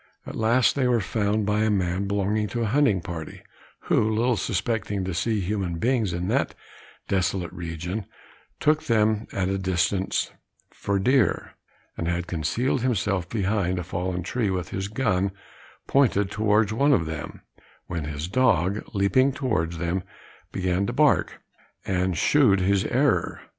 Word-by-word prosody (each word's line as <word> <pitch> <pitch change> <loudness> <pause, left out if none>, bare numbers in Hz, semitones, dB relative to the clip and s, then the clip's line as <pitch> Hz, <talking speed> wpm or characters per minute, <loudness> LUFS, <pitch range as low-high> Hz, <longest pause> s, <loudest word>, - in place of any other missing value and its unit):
At - - -7
last 120 +3 +3
they 135 -3 +2
were 120 -1 +3
found 105 +2 0
by 105 +1 +1
a 110 0 +2
man 95 -1 0
belonging 100 +2 0
to 120 +2 -2
a 110 0 -1
hunting 135 -11 +3
party, 80 -2 -7 0.4
who, 110 - +2
little 115 +3 +2
suspecting 100 0 -2
to 95 - -3
see 105 +5 0
human 95 -2 -2
beings 115 -1 +1
in 85 +1 -3
that - - 0 0.5
desolate 90 -2 -1
region, 85 +4 -5 0.5
took 155 +1 +2
them 110 -1 +2
at 95 -2 -1
a 95 0 -1
distance 95 +1 0 0.4
for 100 0 -1
deer, 130 +7 +2 0.5
and 85 - -3
had 85 0 -1
concealed 90 - -1
himself 100 -7 0
behind 100 -3 0
a 90 - -2
fallen 90 0 -3
tree, 110 +3 -1
with 90 -2 -2
his 95 +1 -3
gun 105 -4 0 0.6
pointed 105 -8 +2
towards 105 0 +2
one 140 +5 +3
of 80 - +2
them, 80 -2 -6 0.4
when 85 -3 -4
his 75 +2 -4
dog, 100 -4 +2
leaping 100 +8 +3
towards 105 - -1
them, 85 +3 -1 0.5
began 95 +1 0
to 120 - -2
bark, 150 +2 +2 0.4
and 90 -2 0
shewed 110 - +4
his 95 +2 +2
error. 130 0 +1
100 Hz, 155 wpm, -25 LUFS, 90-115 Hz, 0.6 s, shewed